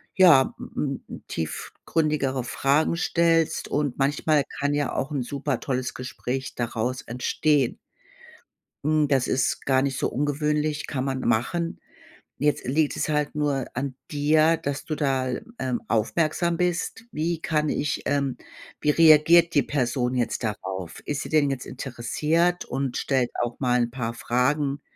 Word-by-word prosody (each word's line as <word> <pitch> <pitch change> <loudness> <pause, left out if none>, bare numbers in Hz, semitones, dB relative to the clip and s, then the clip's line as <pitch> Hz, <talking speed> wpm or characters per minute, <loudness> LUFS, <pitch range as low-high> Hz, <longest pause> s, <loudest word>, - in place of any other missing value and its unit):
ja, 170 -8 +6
m - - -9
m 140 -2 -2
m - - -9
tiefgründigere 135 - -2
Fragen 145 +7 +1
stellst 165 -1 +2
und 145 -4 -1
manchmal 145 +1 +2 0.2
kann 145 0 +1
ja 145 -1 0
auch 140 +3 -2
'n 135 -4 -1
super 140 0 -2
tolles 130 -2 -2
Gespräch 130 +1 -5
daraus 120 +1 -2
entstehen. 130 +2 0 1.1
Hm, 155 0 +2
das 135 -3 +2
ist 130 - 0
gar 130 -1 +3
nicht 135 -1 -1
so - - 0
ungewöhnlich. 150 +2 -1
Kann 130 -3 -2
man 130 -1 -2
machen. 165 +9 0 0.6
Jetzt 150 +2 0
liegt 145 +3 +1
es - - -1
halt 150 0 0
nur 145 -3 0
an 130 0 -3
dir, 155 +2 +3
dass 140 0 -4
du 155 - -2
da, 135 -3 0 0.3
ähm, 125 -2 -1
aufmerksam 160 +9 +1
bist. 180 +5 -1
Wie 165 +1 -1
kann 150 -2 0
ich, 150 - -1
ähm 140 -3 0 0.4
wie 150 - 0
reagiert 165 +2 +6
die 145 - +5
Person 125 -2 -1
jetzt 120 0 -1
darauf? 95 -5 -4
Ist 145 -1 -2
sie - - -6
denn 150 -3 +3
jetzt 130 -2 -4
interessiert 150 +8 0
und 135 -1 -2
stellt 130 -3 +1
auch 120 0 -4
mal 125 -2 +2
'n 120 0 -1
paar 115 -3 -3
Fragen 140 +4 0
140 Hz, 150 wpm, -25 LUFS, 130-155 Hz, 1.1 s, ja